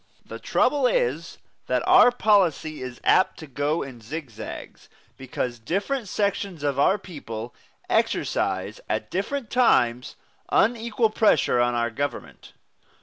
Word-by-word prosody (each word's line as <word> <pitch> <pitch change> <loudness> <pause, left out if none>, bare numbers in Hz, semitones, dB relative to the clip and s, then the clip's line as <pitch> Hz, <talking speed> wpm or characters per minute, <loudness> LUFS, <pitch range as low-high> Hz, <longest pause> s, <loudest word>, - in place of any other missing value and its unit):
The - - -9
trouble 280 -3 +2
is - - -1 0.3
that - - 0
our - - +7
policy 190 - +1
is 125 -1 -7
apt 185 - +3
to 160 - -9
go 145 +3 -1
in 130 -4 -10
zigzags, 135 0 -8 0.3
because 125 -2 -4
different 200 - -2
sections 195 -5 -2
of 140 -2 -1
our 190 +8 +4
people 125 - -8 0.3
exercise - - -1
at 110 - -2
different 230 +6 -3
times 125 - +2 0.3
unequal 230 0 +1
pressure 205 - +3
on 120 0 +1
our 120 -1 0
government. 145 +5 -6
160 Hz, 125 wpm, -24 LUFS, -, 0.3 s, our